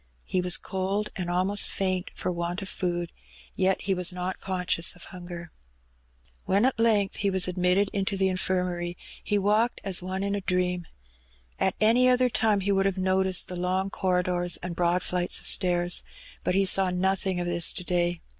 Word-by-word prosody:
He 185 - -1
was 180 0 +3
cold, 195 +2 -2
and 180 -2 -3
almost 185 +3 +1
faint 185 -2 -1
for - - -2
want 175 +2 -3
of 190 - -5
food, 175 -1 -3 0.4
yet 190 0 +1
he 195 - +1
was 180 -1 +1
not 180 +1 -4
conscious 180 -3 +1
of 175 - -11
hunger. 175 -2 -9 0.9
When 200 +5 +3
at 260 -3 +1
length 215 -4 +2
he 200 - +1
was 190 -1 +2
admitted 180 +2 +2
into 195 0 -1
the 190 0 +2
Infirmary 180 -2 -1 0.3
he 205 - 0
walked 210 +4 +1
as 190 -3 +2
one 185 +2 -3
in 200 0 -1
a 205 - -2
dream. 180 -2 -1 0.7
At 190 - +2
any 235 +4 +4
other 250 0 +3
time 215 -3 +2
he 200 +1 0
would 195 0 +2
have 195 -1 -2
noticed 185 0 +2
the 180 - -6
long 185 +2 -1
corridors 180 -2 0
and 175 -1 -4
brpad 175 +1 +1
fiights 180 0 +1
of - - -13
stairs. 175 -2 +1 0.4
But 180 - 0
he 195 - +4
savr 190 -1 +2
nothing 190 0 0
of 175 - -2
this 175 -1 +1
to 180 - -6
day. 175 -1 0
185 Hz, 185 wpm, -27 LUFS, 180-195 Hz, 0.9 s, any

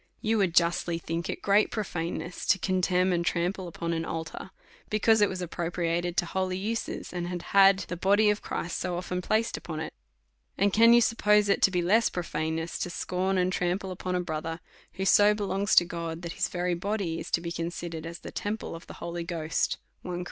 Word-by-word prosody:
You 220 0 +1
would 185 -4 +1
justly 170 0 +2
think 165 0 -4
it - - -4
great 205 +1 +4
prophaneness 175 -4 -4
to 190 - +5
con 185 0 0
temn 180 0 +2
and 170 -1 +1
trample 180 +2 -1
upon 170 0 -3
an 165 0 -1
altar, 165 +3 -5 0.4
because 215 +1 +3
it 205 - +5
was 185 -1 -4
ap 170 - -7
propriated 170 0 -1
to - - +3
holy 185 +1 -2
uses', 220 +1 -4
and 175 -1 -3
had 175 -1 -4
had 195 -1 +7
the 180 - -4
body 200 +4 +4
of 210 - -3
Christ 170 - -3
so 175 - -2
often 180 0 -3
placed 220 +5 0
upon 160 -2 -6
it; 160 - -5 0.6
and 200 0 +2
can 230 +1 +7
you 240 - +7
suppose 210 -2 +3
it 200 - +2
to - - +6
be 180 -2 0
less 215 +6 +4
prophaneness 160 -1 -3
to - - -2
scorn 185 +2 -1
and 185 0 +1
trample 180 +2 -1
upon 180 0 -3
a - - +1
brother, 165 -1 -4 0.3
who 190 +1 -3
so 205 +2 +6
belongs 200 0 0
to 175 - +7
God, 170 -1 -5
that 170 -1 -4
his - - 0
very 180 0 -1
body 185 -2 -2
is - - -7
to - - +2
be 170 0 -5
considered 165 -1 -4
as 170 +1 -7
the - - -8
temple 210 +2 -4
of 165 - -10
the - - -9
Holij 170 0 -5
Ghost, 165 -3 -1 0.3
J - - -7
Cor. 175 -1 -3
180 Hz, 215 wpm, -28 LUFS, 170-195 Hz, 0.6 s, had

